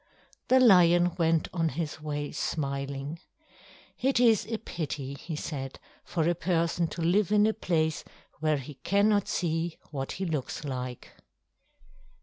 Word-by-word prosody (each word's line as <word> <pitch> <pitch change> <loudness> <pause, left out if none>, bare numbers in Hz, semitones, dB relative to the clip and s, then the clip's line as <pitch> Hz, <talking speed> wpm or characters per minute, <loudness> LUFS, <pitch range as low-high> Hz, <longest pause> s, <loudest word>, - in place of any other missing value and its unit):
The 260 - +5
lion 175 -6 +6
went 165 -1 +2
on 165 -3 +1
his 155 +1 -4
way 145 -1 -3
smiling. 140 +1 -3 0.8
"It 265 -1 +2
is 230 -4 +4
a 225 - -2
pity," 150 -9 -5
he 160 +3 -6
said, 135 -3 -5 0.2
"for 165 -2 -1
a 175 - +3
person 170 -1 0
to 165 +1 -5
live 185 +3 +2
in 210 0 +5
a 220 - +2
place 160 -5 0 0.4
where 155 -1 +2
he 140 +2 -8
cannot 205 +1 +3
see 165 -1 -1
what 135 -2 -4
he 190 - -3
looks 150 -3 -3
like." 125 -2 -5
165 Hz, 140 wpm, -28 LUFS, 145-180 Hz, 0.8 s, lion